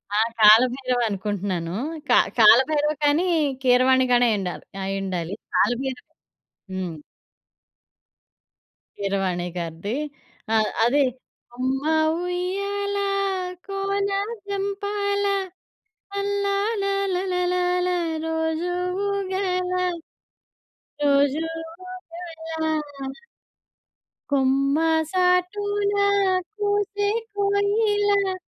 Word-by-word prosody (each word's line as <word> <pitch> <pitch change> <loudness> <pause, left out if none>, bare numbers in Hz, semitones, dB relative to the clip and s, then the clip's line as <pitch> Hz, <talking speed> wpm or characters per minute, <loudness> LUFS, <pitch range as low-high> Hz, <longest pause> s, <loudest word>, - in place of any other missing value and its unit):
ఆ! - - +2 0.2
'కాలభైరవ' 245 +3 +5
అనుకుంటున్నాను. 190 -4 -3 0.4
క - - +2 0.3
కాలభైరవ 290 +7 +5
కానీ, 300 +5 +3 0.4
కీరవాణి 255 +1 +4
గానీ 245 0 +5
అయ్యుండాలి 190 -4 -3 0.2
అయ్యుండాలి. 190 -2 -3 0.2
కాలబైరవ 255 +1 0 0.7
హ్మ్. 180 -4 -4 2.0
కీరవాణి 195 -3 -1
గారిది. 170 +6 -4 0.6
ఆహ్, 220 -1 +3
అది 280 +5 +3 0.5
'అమ్మ 260 +2 -1 0.4
ఉయ్యాలా 400 +3 -2 0.6
కోన 395 0 -1 0.4
జంపాల. 405 0 -1 0.9
లల్లాల 400 +1 0 0.3
లలలాల 360 -1 0 0.4
రోజు 320 +2 -1 0.4
ఊగాలా, 370 -2 -1 1.2
రోజు 285 +2 +3 0.5
ఊగాలా.' 320 - -5 1.1
'కొమ్మ 275 +1 +2 0.3
సాటున 400 +3 +1 0.6
కూసే 410 0 0 0.3
కోయిలా' 405 -1 +2
325 Hz, 65 wpm, -23 LUFS, 250-400 Hz, 2.0 s, కాలభైరవ